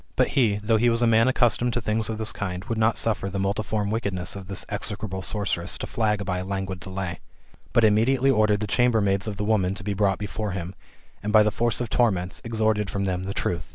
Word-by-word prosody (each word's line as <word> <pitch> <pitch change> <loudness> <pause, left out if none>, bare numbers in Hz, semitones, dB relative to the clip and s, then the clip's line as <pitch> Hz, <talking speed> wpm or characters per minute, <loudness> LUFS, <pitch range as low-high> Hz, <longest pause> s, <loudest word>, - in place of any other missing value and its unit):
But - - +2
he, 115 -7 +2
though 105 +2 +1
he 120 +2 +3
was 115 +1 +2
a - - +5
man 115 +1 +4
accustomed 120 -1 +2
to 120 - 0
things 110 0 -1
of 110 - -3
this 110 0 -2
kind, 95 -2 -4
would 115 - -3
not 110 +1 +3
suffer 105 -3 +1
the 100 - -4
multiform 100 +1 -1
wickedness 100 -6 -2
of 95 -2 -8
this 100 - +1
execrable 105 -2 -3
sor«:eress 95 -4 -1
to - - -5
flag 105 -3 -1
by 90 -1 -2
a - - -4
languid 95 -1 -4
delay; 95 -1 -5 0.5
but 115 - +3
immediately 120 +5 +3
ordered 110 -3 +2
the - - 0
chambermaids 100 -2 +1
of 105 -2 -4
the 105 - -2
woman 100 -3 +1
to 100 - -7
be 100 0 -2
brought 100 -1 +1
before 105 +1 -4
him, 90 -1 -5 0.5
and, 105 - -3
by 110 0 +7
the 105 - +1
force 120 +2 0
of 120 -3 -4
torments, 95 -6 +1
extorted 110 -2 0
from 100 - -2
them 95 -1 -2
the 100 - -3
truth. 85 -1 -2
105 Hz, 230 wpm, -25 LUFS, 95-110 Hz, 0.5 s, by